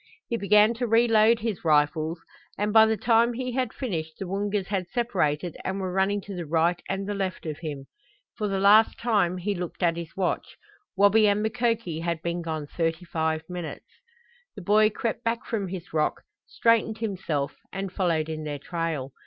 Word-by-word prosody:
He 235 Hz, -, -1 dB
began 210 Hz, +1 st, +4 dB
to 240 Hz, +1 st, -2 dB
reload 225 Hz, 0 st, +4 dB
his 220 Hz, -4 st, -3 dB
rifles 155 Hz, +1 st, +2 dB, 0.4 s
and 210 Hz, +1 st, -1 dB
by 220 Hz, 0 st, +8 dB
the 220 Hz, 0 st, +1 dB
time 235 Hz, +3 st, +3 dB
he 250 Hz, +1 st, -3 dB
had 250 Hz, -2 st, -1 dB
finished 160 Hz, -, -4 dB
the 195 Hz, -, -5 dB
Woongas 200 Hz, +1 st, -1 dB
had 190 Hz, -3 st, -1 dB
separated 175 Hz, -9 st, -1 dB
and 190 Hz, +1 st, -2 dB
were 185 Hz, -1 st, -3 dB
running 195 Hz, +2 st, +1 dB
to 200 Hz, +1 st, -8 dB
the 175 Hz, -3 st, -5 dB
right 170 Hz, +3 st, +1 dB
and 195 Hz, 0 st, -2 dB
the 205 Hz, -, -2 dB
left 190 Hz, -4 st, -3 dB
of 155 Hz, -2 st, -4 dB
him. 145 Hz, -4 st, -6 dB, 0.5 s
For 210 Hz, -, -2 dB
the 195 Hz, -1 st, -1 dB
last 210 Hz, +3 st, +5 dB
time 205 Hz, -7 st, +1 dB
he 200 Hz, +3 st, -1 dB
looked 180 Hz, 0 st, -5 dB
at 170 Hz, -1 st, +2 dB
his 170 Hz, 0 st, -7 dB
watch. 190 Hz, -2 st, -2 dB, 0.4 s
Wabi 205 Hz, +2 st, +5 dB
and 205 Hz, +1 st, +2 dB
Mukoki 230 Hz, -7 st, -1 dB
had 170 Hz, -1 st, -2 dB
been 170 Hz, 0 st, -2 dB
gone 160 Hz, -3 st, -4 dB
thirty 165 Hz, +3 st, -2 dB
five 160 Hz, -1 st, -1 dB
minutes. 175 Hz, -3 st, -6 dB, 0.7 s
The 200 Hz, -, -8 dB
boy 215 Hz, +3 st, +4 dB
crept 225 Hz, +1 st, -3 dB
back 230 Hz, 0 st, -1 dB
from 205 Hz, -4 st, -2 dB
his 180 Hz, -2 st, -7 dB
rock, 155 Hz, -1 st, 0 dB, 0.2 s
straightened 230 Hz, -1 st, +2 dB
himself, 185 Hz, -10 st, -2 dB, 0.2 s
and 195 Hz, -1 st, -5 dB
followed 165 Hz, -5 st, 0 dB
in 155 Hz, -1 st, -5 dB
their 150 Hz, -1 st, -4 dB
trail. 155 Hz, -3 st, -3 dB
190 Hz, 185 wpm, -26 LUFS, 165-215 Hz, 0.7 s, by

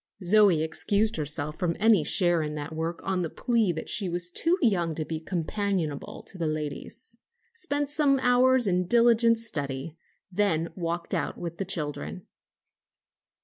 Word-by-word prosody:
Zoe 190 Hz, -4 st, +4 dB
excused 205 Hz, +6 st, 0 dB
herself 150 Hz, 0 st, -3 dB
from 175 Hz, -3 st, -1 dB
any 215 Hz, -5 st, +4 dB
share 175 Hz, 0 st, +3 dB
in 150 Hz, 0 st, -4 dB
that 150 Hz, +1 st, -6 dB
work 165 Hz, +2 st, -4 dB
on 190 Hz, -1 st, -1 dB
the 165 Hz, -, -2 dB
plea 230 Hz, -3 st, +1 dB
that 160 Hz, -, -6 dB
she 200 Hz, -4 st, -1 dB
was 175 Hz, 0 st, -2 dB
too 335 Hz, -, +2 dB
young 175 Hz, -, +1 dB
to 155 Hz, -, -3 dB
be 160 Hz, 0 st, -4 dB
companionable 175 Hz, -2 st, -3 dB
to 190 Hz, -, -12 dB
the 165 Hz, -, 0 dB
ladies, 155 Hz, -, -5 dB, 0.4 s
spent 290 Hz, -10 st, -2 dB
some 290 Hz, -2 st, +3 dB
hours 250 Hz, 0 st, +3 dB
in 180 Hz, -2 st, +1 dB
diligent 230 Hz, +1 st, +4 dB
study, 150 Hz, -7 st, -4 dB, 0.3 s
then 175 Hz, -4 st, 0 dB
walked 170 Hz, -1 st, -3 dB
out -, -, -2 dB
with 170 Hz, -1 st, -6 dB
the 195 Hz, -, -2 dB
children. 145 Hz, -, -4 dB
175 Hz, 155 wpm, -27 LUFS, 160-220 Hz, 0.4 s, Zoe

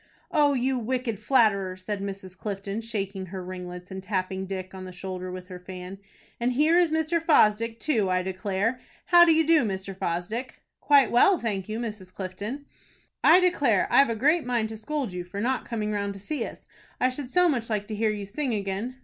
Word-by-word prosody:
"O 290 Hz, -1 st, +4 dB
you 260 Hz, 0 st, 0 dB
wicked 245 Hz, -2 st, -2 dB
flatterer!" 200 Hz, -8 st, +2 dB
said 195 Hz, +2 st, -4 dB
Mrs. 195 Hz, -2 st, -6 dB
Clifton, 200 Hz, +1 st, -4 dB
shaking 195 Hz, -4 st, -4 dB
her 185 Hz, 0 st, -6 dB
ringlets, 180 Hz, 0 st, -8 dB
and 190 Hz, 0 st, -5 dB
tapping 190 Hz, -1 st, -2 dB
Dick 185 Hz, -1 st, -5 dB
on 190 Hz, -1 st, -8 dB
the 185 Hz, -, -8 dB
shoulder 185 Hz, 0 st, -6 dB
with 180 Hz, 0 st, -8 dB
her 180 Hz, -1 st, -8 dB
fan. 185 Hz, +1 st, -8 dB, 0.4 s
"And 245 Hz, +1 st, +1 dB
here 305 Hz, +6 st, +3 dB
is 350 Hz, -1 st, +4 dB
Mr. 320 Hz, +1 st, 0 dB
Fosdick 230 Hz, -7 st, +3 dB
too, 225 Hz, -9 st, +1 dB
I 185 Hz, 0 st, +1 dB
declare. 190 Hz, +5 st, -1 dB, 0.3 s
How 345 Hz, -1 st, +7 dB
do 335 Hz, -, +5 dB
you 320 Hz, 0 st, +4 dB
do, 320 Hz, -3 st, +5 dB
Mr. 195 Hz, -2 st, -3 dB
Fosdick?" 195 Hz, +9 st, -4 dB, 0.2 s
"Quite 285 Hz, -2 st, +5 dB
well, 355 Hz, +11 st, +5 dB
thank 205 Hz, -, -3 dB
you, 215 Hz, -, -2 dB
Mrs. 210 Hz, -6 st, -6 dB
Clifton." 205 Hz, +10 st, -6 dB, 0.6 s
"I 335 Hz, +3 st, +8 dB
declare 285 Hz, -, +2 dB
I've 275 Hz, -3 st, +6 dB
a 230 Hz, -, 0 dB
great 300 Hz, +9 st, +3 dB
mind 240 Hz, -3 st, -1 dB
to 220 Hz, -, -7 dB
scold 260 Hz, -1 st, -3 dB
you 180 Hz, 0 st, -4 dB
for 180 Hz, +3 st, -7 dB
not 255 Hz, +4 st, -1 dB
coming 215 Hz, -2 st, -2 dB
round 200 Hz, -1 st, -2 dB
to -, -, -9 dB
see 250 Hz, +5 st, -3 dB
us. -, -, -12 dB, 0.3 s
I 255 Hz, -, +3 dB
should 255 Hz, 0 st, -6 dB
so 360 Hz, +4 st, +4 dB
much 240 Hz, -8 st, 0 dB
like 210 Hz, -2 st, -1 dB
to 215 Hz, -, -4 dB
hear 220 Hz, +1 st, +1 dB
you 205 Hz, -1 st, -3 dB
sing 250 Hz, +4 st, -2 dB
again." 200 Hz, +5 st, -3 dB
215 Hz, 205 wpm, -26 LUFS, 190-255 Hz, 0.6 s, I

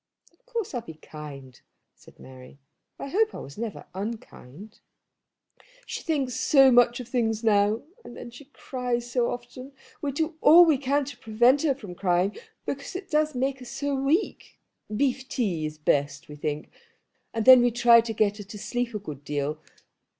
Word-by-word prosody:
"Of 340 Hz, -, -35 dB
course 465 Hz, -8 st, -4 dB
I'll 245 Hz, -, -2 dB
be 160 Hz, -7 st, -11 dB
kind," 145 Hz, -4 st, -11 dB, 0.3 s
said -, -, -20 dB
Mary; 130 Hz, +1 st, -14 dB, 0.4 s
"I 275 Hz, -, -6 dB
hope 430 Hz, +6 st, +1 dB
I -, -, -6 dB, 0.2 s
never 225 Hz, -2 st, -5 dB
was -, -, -17 dB
unkind." 205 Hz, -, -8 dB, 1.1 s
"She -, -, -5 dB
thinks 280 Hz, -6 st, -1 dB
so 270 Hz, +1 st, +5 dB
much 245 Hz, 0 st, +4 dB
of 250 Hz, -, -7 dB
things 230 Hz, -3 st, -1 dB
now, 210 Hz, 0 st, +2 dB, 0.2 s
and 240 Hz, -, -11 dB
then 240 Hz, -, -9 dB
she 245 Hz, +5 st, -13 dB
cries 245 Hz, -3 st, -4 dB
so 245 Hz, -1 st, +1 dB
often. 255 Hz, +3 st, -8 dB, 0.3 s
We 285 Hz, -, -2 dB
do 315 Hz, +3 st, -2 dB
all 345 Hz, +3 st, +8 dB
we 310 Hz, -5 st, +3 dB
can 280 Hz, +1 st, 0 dB
to 285 Hz, -, -9 dB
prevent 240 Hz, +5 st, +3 dB
her 290 Hz, -4 st, +1 dB
from 210 Hz, -9 st, -9 dB
crying, 180 Hz, +2 st, 0 dB, 0.3 s
because -, -, -5 dB
it 370 Hz, -2 st, -7 dB
does 305 Hz, -1 st, +1 dB
make 265 Hz, +1 st, -1 dB
her 250 Hz, -, -10 dB
so 275 Hz, +4 st, -3 dB
weak. 275 Hz, +9 st, -1 dB, 0.4 s
Beef 260 Hz, +1 st, 0 dB
tea 175 Hz, -11 st, -1 dB
is 155 Hz, 0 st, -9 dB
best, 145 Hz, -1 st, 0 dB
we 150 Hz, -, -10 dB
think; 150 Hz, 0 st, -4 dB, 0.6 s
and 225 Hz, -2 st, -2 dB
then 255 Hz, -1 st, +9 dB
we 245 Hz, -, +4 dB
try 235 Hz, 0 st, +6 dB
to 225 Hz, 0 st, -5 dB
get 210 Hz, -1 st, +1 dB
her -, -, -6 dB
to 205 Hz, +2 st, -10 dB
sleep 235 Hz, +3 st, -3 dB
a -, -, +1 dB
good 150 Hz, -9 st, -9 dB
deal. 145 Hz, +1 st, -3 dB
240 Hz, 180 wpm, -26 LUFS, 200-270 Hz, 1.1 s, then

